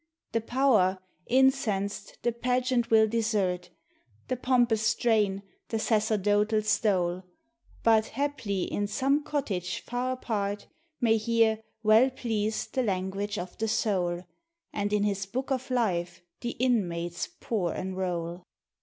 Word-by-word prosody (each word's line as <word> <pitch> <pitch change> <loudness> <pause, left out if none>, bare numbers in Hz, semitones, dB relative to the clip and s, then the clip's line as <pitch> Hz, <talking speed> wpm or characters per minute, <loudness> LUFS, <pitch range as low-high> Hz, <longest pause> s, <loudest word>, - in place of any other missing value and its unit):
The 230 - 0
Power, 225 -6 +3 0.3
incensed, 225 -7 +1
the 240 - +2
pageant 250 +1 0
will 220 -1 +6
desert, 210 -6 0 0.6
The 255 - +1
pompous 245 -3 +2
strain, 215 -3 +2 0.3
the 225 - -1
sacerdotal 215 -1 +2
stole; 190 -4 +1 0.6
But, 225 -1 +4
haply, 230 -8 -2
in 205 0 -2
some 275 +8 +1
cottage 200 - -2
far 250 +1 -2
apart, 205 -5 -3 0.4
May 225 -2 +4
hear, 220 0 +2 0.2
well 220 +4 +6
pleased, 220 -4 -2
the 260 - +1
language 200 -1 -2
of 180 -1 -6
the 225 - 0
soul; 180 -5 0 0.5
And 205 0 -1
in 210 -1 +2
his 200 -1 -1
Book 260 +6 -4
of 260 0 -1
Life 180 -8 -1 0.2
the 240 - -3
inmates 175 -9 0
poor 190 -7 -1
enroll. 180 -2 -3
215 Hz, 125 wpm, -28 LUFS, 195-240 Hz, 0.6 s, will